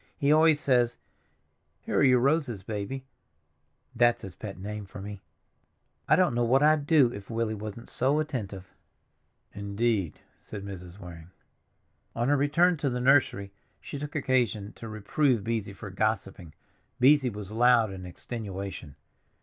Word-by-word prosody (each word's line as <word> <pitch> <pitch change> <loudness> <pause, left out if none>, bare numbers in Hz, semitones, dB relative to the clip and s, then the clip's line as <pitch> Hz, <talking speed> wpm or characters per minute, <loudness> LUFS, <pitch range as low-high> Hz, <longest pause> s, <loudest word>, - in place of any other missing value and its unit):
He 145 -1 +2
always 155 0 +5
says, 120 -4 +2 0.8
'Here - - -2
are - - +4
your 130 -2 +6
roses, 130 - 0
Baby'—that's 120 +2 -4
his 95 - -8
pet 100 +3 -8
name 105 +2 -6
for 95 - -10
me. 100 0 -8 0.9
I - - +6
don't 180 -7 +3
know 120 0 +1
what 130 +4 +3
I'd 150 -1 +3
do 140 -7 +4
if 100 -1 -9
Willie 115 -1 -1
wasn't 110 +2 -7
so 135 +4 +1
attentive." 105 -11 -5 0.8
"Indeed," 100 -2 -1 0.2
said 100 -1 -8
Mrs. 90 -2 -9
Waring. 85 -4 -11 0.9
On 120 +3 0
her 145 - +4
return 160 +5 +3
to 145 -1 -1
the 125 -1 -2
nursery 125 -7 +3 0.3
she 140 - -7
took 145 +1 -7
occasion 120 -7 0
to 115 - -9
reprove 110 +3 0
Beesy 110 -3 -3
for 100 -1 -8
gossiping. 95 -5 -2 0.4
Beesy 130 -1 +5
was 105 -1 -8
loud 115 -1 +4
in 95 -1 -8
extenuation. 95 - -7
115 Hz, 145 wpm, -28 LUFS, 100-135 Hz, 0.9 s, your